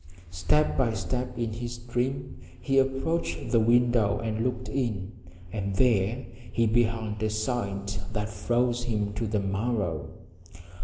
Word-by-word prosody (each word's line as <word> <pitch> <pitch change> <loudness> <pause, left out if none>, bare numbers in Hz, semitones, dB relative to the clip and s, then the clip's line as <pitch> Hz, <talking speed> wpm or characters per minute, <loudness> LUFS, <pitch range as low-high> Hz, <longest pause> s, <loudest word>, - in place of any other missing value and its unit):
Step 90 - +2
by 125 -4 +2
step 125 +4 -3
in 115 -2 -1
his 120 +1 -4
dream 125 +3 -2 0.2
he 135 +8 +3
approached 135 +5 0
the 115 - +5
window 115 -2 +4
and 110 0 -2
looked 125 0 -2
in. 110 -8 -2 0.4
And 100 -2 -2
there 120 +1 +2 0.3
he 115 - +2
beheld 110 -1 +1
a 110 - +1
sight 100 -3 -2
that 105 -1 -1
froze 120 +4 0
him 105 -3 -1
to 110 +2 -2
the 105 0 +1
marrow. 100 -5 -1
115 Hz, 140 wpm, -28 LUFS, 105-125 Hz, 0.4 s, the